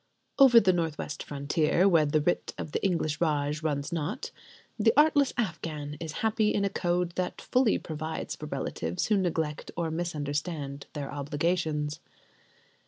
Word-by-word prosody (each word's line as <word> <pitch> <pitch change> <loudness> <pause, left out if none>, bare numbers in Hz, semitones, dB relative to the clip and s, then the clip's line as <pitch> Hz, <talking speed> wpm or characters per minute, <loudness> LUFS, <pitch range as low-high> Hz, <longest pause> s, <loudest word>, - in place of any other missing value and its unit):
Over 255 -4 +9
the 190 -4 +3
north 165 -3 -1
west 150 - -5
frontier, 150 +5 +1
where 165 -5 +4
the 150 +1 +2
writ 175 +4 -1
of 150 - -5
the - - -2
English 165 -6 0
Raj 150 -2 0
runs 145 -1 -2
not, 170 - -3 0.5
the 225 +1 +5
artless 295 -2 +5
Afghan 155 -8 -3
is 160 -2 -5
happy 220 -1 +2
in 200 - +1
a 195 - -1
code 175 -2 0
that 180 -1 -2
fully 250 -3 +2
provides 155 0 -5
for - - -8
relatives 85 +2 -3
who 215 - +4
neglect 160 -5 -1
or 165 -2 -1
misunderstand 150 -3 -3
their 145 -2 -5
obligations. 150 +1 -1
160 Hz, 155 wpm, -28 LUFS, 150-185 Hz, 0.5 s, Over